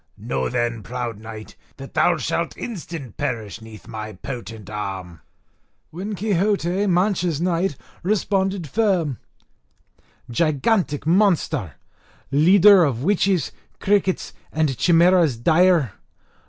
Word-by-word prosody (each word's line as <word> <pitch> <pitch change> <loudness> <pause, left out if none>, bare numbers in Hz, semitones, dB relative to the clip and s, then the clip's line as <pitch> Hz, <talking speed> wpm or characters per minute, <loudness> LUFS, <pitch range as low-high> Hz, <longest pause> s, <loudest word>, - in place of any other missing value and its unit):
Know 65 -1 -2
then, 120 -2 -1
proud 120 0 -5
knight, 110 0 -10 0.2
that 135 0 -10
thou 175 -1 +3
shalt 165 +4 -2
instant 165 - -7
perish 115 -6 -4
'neath 110 -2 -12
my 110 -1 -6
potent 110 -1 -8
arm." 95 -5 -6 0.7
When 195 +6 -5
Quixote, 200 -1 0
Mancha's 180 -3 +1
knight, 175 -1 0 0.3
responded 195 -2 0
firm: 180 - 0 1.1
"Gigantic 155 - 0
monster! 170 - +1 0.6
leader 185 +6 +6
of 130 -5 -1
witches, 190 -1 +1 0.3
crickets, 195 -2 0 0.2
and 155 -4 0
chimeras 170 -3 +4
dire! 165 - +3
160 Hz, 100 wpm, -22 LUFS, 115-185 Hz, 1.1 s, leader